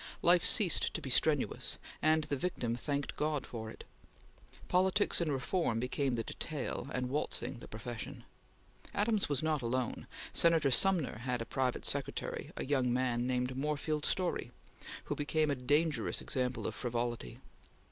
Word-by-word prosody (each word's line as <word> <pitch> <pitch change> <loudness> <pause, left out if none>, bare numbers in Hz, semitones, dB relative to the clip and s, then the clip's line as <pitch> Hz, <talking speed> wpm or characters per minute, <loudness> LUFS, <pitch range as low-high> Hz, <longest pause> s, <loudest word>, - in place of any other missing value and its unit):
Life 175 0 +6
ceased 200 -8 +6
to - - -1
be 135 - -5
strenuous, 150 +1 +1 0.2
and 155 0 +3
the 145 - -2
victim 130 -7 -2
thanked 140 +2 -3
God 150 -2 -1
for 110 -2 -6
it. - - -10 0.8
Politics 190 +2 +2
and 160 -3 0
reform 135 -2 0
became 125 +1 0
the 115 - -1
detail, 145 0 -4
and 125 -2 -1
waltzing 135 -3 -2
the - - -10
profession. 120 +3 -7 0.7
Adams 210 -2 +1
was 145 0 0
not 155 -3 +1
alone. 120 0 -2 0.3
Senator 165 -5 +4
Sumner 170 - +3
had 125 0 -2
as 115 - -5
private 130 -2 -1
secretary - - -2
a - - -3
young 130 -3 +1
man 125 -1 0
named 125 0 -1
Moorfield 150 +2 -1
Storey, 180 -10 0 0.5
who - - -3
became 155 0 +1
a - - +1
dangerous 145 +5 +1
example 125 -2 -2
of - - -2
frivolity. 120 - -3
135 Hz, 150 wpm, -33 LUFS, 125-155 Hz, 0.8 s, Life